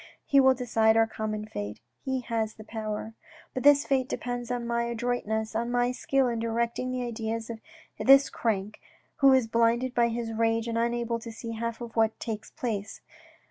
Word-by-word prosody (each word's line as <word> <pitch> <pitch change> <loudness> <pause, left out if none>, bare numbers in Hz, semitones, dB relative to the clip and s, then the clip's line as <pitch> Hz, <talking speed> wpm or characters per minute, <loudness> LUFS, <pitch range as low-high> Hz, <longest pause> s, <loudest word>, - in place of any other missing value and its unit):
He 280 - +4
will 265 -1 +6
decide 225 -3 +2
our 225 - +5
common 215 -1 -4
fate. 105 - -6 0.2
He 265 -1 -1
has 225 -2 -2
the 215 - -11
power. 220 0 -5 0.4
But 255 - -3
this 285 +1 +6
fate 260 -1 +1
depends 245 -3 -4
on 245 -1 -2
my 235 0 0
adroitness, 230 -2 -2
on 235 +1 -1
my 245 0 +1
skill 265 +1 +1
in 235 -2 -1
directing 235 +2 -1
the 255 0 -2
ideas 225 0 -4
of 225 - -7 0.4
this 275 +1 +7
crank, 210 -2 -2 0.4
who 275 -1 +6
is 260 -3 +4
blinded 230 +2 +1
by 235 -1 +3
his 230 -1 -3
rage 225 +1 +1
and 230 - -2
unable 235 0 0
to 230 0 -8
see 230 +1 -7
half 230 +1 -4
of 235 -1 -7
what 225 -1 +2
takes 220 -2 -5
place. 215 -4 -4
230 Hz, 185 wpm, -28 LUFS, 225-245 Hz, 0.4 s, this